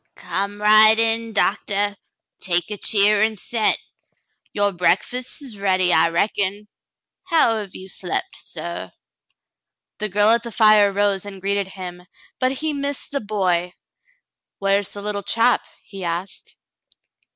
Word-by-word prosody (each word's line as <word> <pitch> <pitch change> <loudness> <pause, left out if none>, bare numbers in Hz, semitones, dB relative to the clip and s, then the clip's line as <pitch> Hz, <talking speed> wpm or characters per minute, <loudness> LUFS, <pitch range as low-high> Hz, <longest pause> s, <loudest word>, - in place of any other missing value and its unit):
"Come 200 +3 -4
right 215 +1 +6
in, 225 0 +1
Doctah; 205 -1 0 0.4
take 175 +1 0
a 210 - -4
cheer 205 0 +3
and 220 0 +1
set. 220 +3 0 0.7
Your 205 0 +1
breakfast's 215 - -2
ready, 185 -2 +2
I 165 +1 +4
reckon. 200 +3 -1 0.6
How 320 -11 +3
have 205 -3 -7
you 190 - -9
slept, 190 - -3
suh - - -6
V - - -27 1.1
The 215 0 -3
girl 205 +3 +4
at 235 0 +3
the 235 0 -8
fire 215 -2 +5
rose 200 -1 0
and 200 -1 -9
greeted 200 0 -1
him, 180 -2 -8 0.4
but 255 0 +2
he 305 +3 -2
missed 280 -1 -4
the 280 -1 -2
boy. 180 -4 -1 0.8
"Where's 195 0 0
the 205 - -7
httle 205 -1 -3
chap 230 +4 +3
.^ - - -23 0.2
" - - -34
he 195 -2 -9
asked. 170 +3 -5
205 Hz, 145 wpm, -21 LUFS, 190-220 Hz, 1.1 s, right